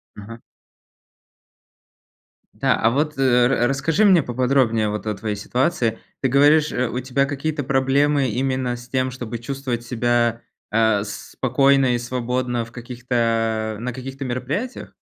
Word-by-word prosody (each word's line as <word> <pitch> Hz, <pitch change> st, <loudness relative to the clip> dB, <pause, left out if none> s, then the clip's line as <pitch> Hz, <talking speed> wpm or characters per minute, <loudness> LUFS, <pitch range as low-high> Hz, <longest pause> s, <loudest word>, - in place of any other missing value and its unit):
Мгм. 115 Hz, +3 st, -10 dB, 2.2 s
Да, -, -, +4 dB
а 115 Hz, -, +2 dB
вот, 150 Hz, +3 st, -1 dB
э, 125 Hz, -2 st, +4 dB
ра 120 Hz, -2 st, +2 dB
расскажи 145 Hz, -, +1 dB
мне 185 Hz, -6 st, +5 dB
поподробнее 125 Hz, -3 st, +1 dB
вот 105 Hz, +1 st, -4 dB
о 110 Hz, -, -1 dB
твоей 105 Hz, +1 st, -3 dB
ситуации. 120 Hz, +2 st, -1 dB, 0.2 s
Ты 135 Hz, -, +1 dB
говоришь, 145 Hz, +3 st, +4 dB
э, 125 Hz, 0 st, 0 dB
у 120 Hz, -, -4 dB
тебя 130 Hz, +2 st, 0 dB
какие-то 145 Hz, +2 st, -3 dB
проблемы 135 Hz, +1 st, +2 dB
именно 130 Hz, +1 st, -1 dB
с 120 Hz, 0 st, -12 dB
тем, 130 Hz, 0 st, -1 dB
чтобы 120 Hz, -2 st, -6 dB
чувствовать 125 Hz, -1 st, -4 dB
себя, 120 Hz, -1 st, 0 dB, 0.3 s
а, 110 Hz, -2 st, +2 dB
спокойно 135 Hz, +6 st, +1 dB
и -, -, +1 dB
свободно 125 Hz, 0 st, -2 dB
в 115 Hz, -, -12 dB
каких-то 115 Hz, -3 st, -1 dB
на 125 Hz, -, -3 dB
каких-то 135 Hz, +2 st, -7 dB
мероприятиях? 135 Hz, -, -4 dB
125 Hz, 140 wpm, -21 LUFS, 115-135 Hz, 2.2 s, мне